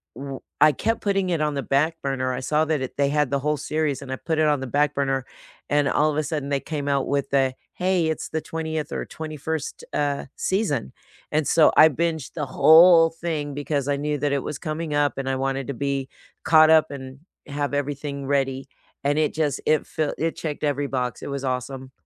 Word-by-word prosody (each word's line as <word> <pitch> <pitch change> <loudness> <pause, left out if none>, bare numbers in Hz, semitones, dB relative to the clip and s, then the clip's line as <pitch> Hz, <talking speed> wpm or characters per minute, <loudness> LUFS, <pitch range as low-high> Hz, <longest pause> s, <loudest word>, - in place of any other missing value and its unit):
w 135 0 -6 0.2
I 155 -1 +6
kept 225 - -1
putting 195 -3 0
it 165 - 0
on 150 -1 0
the 140 - -2
back 155 +4 +1
burner. 130 -2 -1
I 125 - -3
saw 155 +4 +1
that 155 -3 0
it 130 - -5
they 140 -1 +2
had 150 -2 +1
the 140 - +1
whole 150 +1 0
series, 150 -2 -1
and 130 - -8
I 130 - -1
put 160 +3 -3
it 155 - +3
on 145 -2 +2
the 135 - -5
back 145 +3 +1
burner, 135 -2 -1 0.5
and 145 -1 +3
all 155 +1 +2
of 150 - -4
a 155 - +1
sudden 145 -2 -3
they 140 -1 +1
came 145 -2 -5
out 140 -1 +1
with 140 -1 -1
the, 135 -2 +2 0.2
"Hey, 180 -2 +1
it's 160 - -3
the 160 - -2
20th 160 -1 -4
or - - -3
21st, 155 -1 -5
uh, 145 -1 -1
season." 190 - -1 0.4
And 155 -1 +1
so 160 - +5
I 160 - +8
binged 160 0 -2
the 150 -3 -2
whole 165 +5 +7
thing 160 -4 -4
because 145 -1 -2
I 145 - +1
knew 150 0 -2
that 145 +1 0
it 140 -1 0
was 145 - -5
coming 155 0 -4
up, 145 -1 +1
and 135 - -3
I 135 - 0
wanted 135 0 -2
to 140 - -3
be 140 0 -2 0.3
caught 155 -1 +6
up 160 -2 +5
and 130 0 -9 0.3
have 145 0 -3
everything 145 -1 -3
ready, 135 -1 0 0.4
and 145 +1 +1
it 155 -1 +1
just 150 -3 -1
it 155 0 +2
felt 155 -2 -2
it 165 +1 -1
checked 155 -2 -5
every 145 -1 0
box. 125 -3 -3
It - - -5
was 140 -1 -4
awesome. 130 0 -4
145 Hz, 225 wpm, -24 LUFS, 135-155 Hz, 0.5 s, I